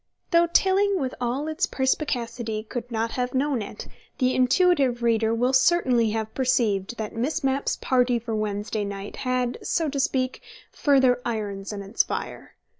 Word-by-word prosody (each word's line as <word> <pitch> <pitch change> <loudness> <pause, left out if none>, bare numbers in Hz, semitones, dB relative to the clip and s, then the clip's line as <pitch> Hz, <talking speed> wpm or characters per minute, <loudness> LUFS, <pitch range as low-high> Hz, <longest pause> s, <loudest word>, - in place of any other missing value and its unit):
Though 340 0 +5
Tilling 385 +3 +3
with 260 -3 -2
all 250 +5 -1
its 315 +5 0
perspicacity 240 -5 -2
could 245 +2 -6
not 225 0 -1
have 250 0 -2
known 270 -2 +1
it, 205 - -8 0.3
the 255 -1 +2
intuitive 260 -2 +3
reader 225 -1 +2
will 245 +3 +1
certainly 260 -5 +3
have 220 0 -3
perceived 240 -5 0
that 215 -1 -5
Miss 280 +7 -1
Mapp's 270 +1 0
party 250 -1 +2
for 230 -1 -4
Wednesday 210 0 -2
night 200 0 -6
had, 255 -1 -1
so 325 -3 0
to 280 0 -3
speak, 255 -1 0 0.3
further 265 -4 +3
irons 205 -4 -4
in 200 -1 -5
its 200 +4 +1
fire. - - -5
250 Hz, 160 wpm, -25 LUFS, 225-270 Hz, 0.3 s, Though